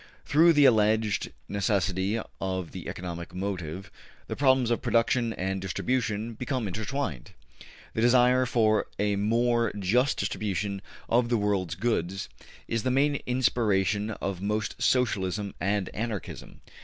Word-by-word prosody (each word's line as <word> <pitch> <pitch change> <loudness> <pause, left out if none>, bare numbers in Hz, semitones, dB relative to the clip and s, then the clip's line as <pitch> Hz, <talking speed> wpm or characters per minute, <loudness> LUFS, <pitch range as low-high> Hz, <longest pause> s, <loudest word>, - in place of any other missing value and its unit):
Through 165 +3 +5
the 145 -2 +5
alleged 110 -3 +3 0.2
necessity 100 +1 0 0.2
of 95 -3 -3
the 90 -2 -7
economic 85 -1 -6
motive, 95 -2 -4 0.3
the - - -5
problems 130 -3 +3
of 120 - 0
production 120 0 +2
and 95 0 -3
distribution 110 +3 -1
become 125 0 -3
intertwined. 110 - -4 0.6
The 110 - -1
desire 125 +1 +4
for 110 -3 +2
a 105 0 +1
more 115 +2 +2
just 120 +8 +2
distribution 100 0 -2 0.3
of 120 +1 +2
the 120 - +2
world's 100 -5 0
goods 95 -3 -1 0.4
is 115 -1 -1
the 130 - -1
main 140 +3 +2
inspiration 105 -5 +1
of 100 -4 -4
most 105 +2 -2
Socialism 100 -5 +1
and 100 +1 0
Anarchism. 110 -2 -6
105 Hz, 130 wpm, -27 LUFS, 95-120 Hz, 0.6 s, Through